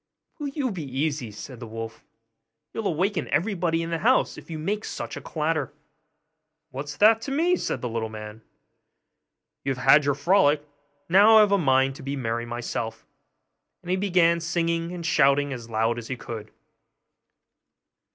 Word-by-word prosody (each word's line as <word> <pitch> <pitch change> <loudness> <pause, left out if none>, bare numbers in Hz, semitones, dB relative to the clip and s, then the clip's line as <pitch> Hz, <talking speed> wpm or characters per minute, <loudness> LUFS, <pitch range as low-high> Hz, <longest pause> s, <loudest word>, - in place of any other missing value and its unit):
'Will 295 - -3
you 275 -3 -2
be 185 -4 -5 0.2
easy?' 145 -5 -1
said 115 +4 -9
the 120 - -8
wolf; 115 0 -7 0.7
'you'll 225 -2 -2
awaken 185 +5 0
everybody 170 -3 0
in 165 - -5
the 165 - -1
house 255 +7 +2
if - - -13
you 160 - -5
make 205 +7 -2
such - - -5
a - - -7
clatter.' 155 -3 -2 1.0
'What's 140 +2 -6
that 220 +2 +5
to 270 - -5
me?' 335 +6 +2
said - - -3
the 125 - -2
little 115 -1 -3
man; 105 0 -9 1.2
'you 135 - -1
have 125 - -8
had 145 +3 +7
your 145 -1 +2
frolic, 150 -1 +3 0.4
now 205 +5 +7
I've 210 -2 +6
a 200 - +5
mind 135 -3 +3
to - - -11
be 140 +1 -4
merry 120 -2 -3
myself'; 115 -1 -4 0.8
and 175 - -4
he - - +3
began, 180 -3 +3
singing 170 0 -1
and 175 -2 -6
shouting 140 -2 +3
as 120 -2 -8
loud 115 +1 0
as 115 - -9
he 130 - -4
could. 115 -2 -7
150 Hz, 170 wpm, -25 LUFS, 120-185 Hz, 1.2 s, had